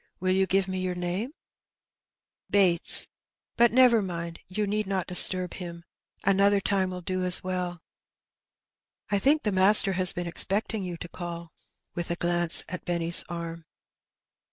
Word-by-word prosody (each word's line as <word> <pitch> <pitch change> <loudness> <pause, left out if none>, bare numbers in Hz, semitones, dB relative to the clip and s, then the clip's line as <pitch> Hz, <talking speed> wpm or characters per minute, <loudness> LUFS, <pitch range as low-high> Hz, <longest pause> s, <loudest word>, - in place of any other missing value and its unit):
Will 185 +1 -1
you 190 0 +1
give 195 0 0
me 185 0 -4
your 185 -1 -3
name? 180 +7 -3
^^ - - -22 0.7
" - - -66
Bates. 185 -4 +4 0.5
But 235 0 +4
never 245 -2 +4
mind, 170 -3 -6
you 210 +3 -3
need 210 0 -2
not 190 -2 -2
disturb 180 0 +3
him; 170 -2 -8 0.4
another 200 +1 +3
time 195 -1 0
will 180 0 -7
do 185 +1 -3
as 180 0 +2
well.^' 180 -1 -4 0.7
" - - -47
I - - +1
think 295 +8 +2
the 210 - -1
master 195 +1 +5
has 185 -1 +4
been 175 - -5
expecting 200 +5 -2
you 180 -2 -6
to 175 - -8
call/* 170 -1 -8 0.4
with 175 -1 -5
a 170 - -1
glance 175 -1 0
at 180 +1 -7
Benny 170 -1 -3
^s - - +5
arm. 170 -1 -7
185 Hz, 170 wpm, -26 LUFS, 175-195 Hz, 0.7 s, master